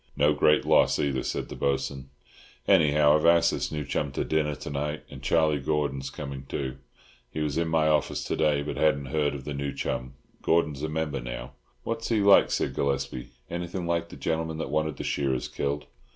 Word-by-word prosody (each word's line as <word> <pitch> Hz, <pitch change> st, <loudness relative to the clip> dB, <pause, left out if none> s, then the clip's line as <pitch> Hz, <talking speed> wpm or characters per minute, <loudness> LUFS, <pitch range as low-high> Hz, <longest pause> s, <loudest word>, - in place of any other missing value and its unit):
"No 75 Hz, +2 st, +4 dB
great 75 Hz, +1 st, +3 dB
loss, -, -, +4 dB
either," 70 Hz, -2 st, 0 dB
said -, -, -3 dB
the -, -, -7 dB
Bo'sun. 70 Hz, -1 st, -2 dB, 0.6 s
"Anyhow 75 Hz, -1 st, +5 dB
I've 75 Hz, -, +1 dB
asked 85 Hz, 0 st, +5 dB
this -, -, -2 dB
new 75 Hz, -2 st, -3 dB
chum 70 Hz, +2 st, -2 dB
to -, -, -1 dB
dinner 75 Hz, -1 st, 0 dB
to 65 Hz, -, -7 dB
night, 75 Hz, +2 st, -3 dB
and -, -, -9 dB
Charlie 80 Hz, -3 st, +2 dB
Gordon's 70 Hz, -2 st, -1 dB
coming 70 Hz, -2 st, -7 dB
too. 65 Hz, -1 st, -3 dB, 0.5 s
He -, -, -5 dB
was 75 Hz, -2 st, -1 dB
in 85 Hz, 0 st, 0 dB
my 80 Hz, -1 st, +2 dB
office 75 Hz, -1 st, +1 dB
to -, -, -2 dB
day, 75 Hz, -2 st, +2 dB
but 75 Hz, -, -5 dB
hadn't 70 Hz, -3 st, +2 dB
heard 75 Hz, -2 st, +1 dB
of 65 Hz, -, -8 dB
the 75 Hz, -, -4 dB
new 70 Hz, 0 st, -3 dB
chum. 65 Hz, 0 st, -4 dB, 0.3 s
Gordon's 75 Hz, -4 st, +1 dB
a 80 Hz, -, -2 dB
member 75 Hz, -3 st, -2 dB
now." -, -, -6 dB, 0.3 s
"What's 115 Hz, 0 st, -3 dB
he 115 Hz, -2 st, +2 dB
like?" 100 Hz, -1 st, +6 dB
said -, -, -1 dB
Gillespie. 70 Hz, -2 st, -2 dB, 0.2 s
"Anything 85 Hz, +1 st, -4 dB
like 85 Hz, 0 st, -1 dB
the -, -, -10 dB
gentleman 80 Hz, -1 st, -2 dB
that 80 Hz, -, -4 dB
wanted 80 Hz, -1 st, 0 dB
the -, -, -5 dB
shearers 65 Hz, -3 st, -1 dB
killed?" 70 Hz, +1 st, -3 dB
75 Hz, 200 wpm, -27 LUFS, 70-80 Hz, 0.6 s, like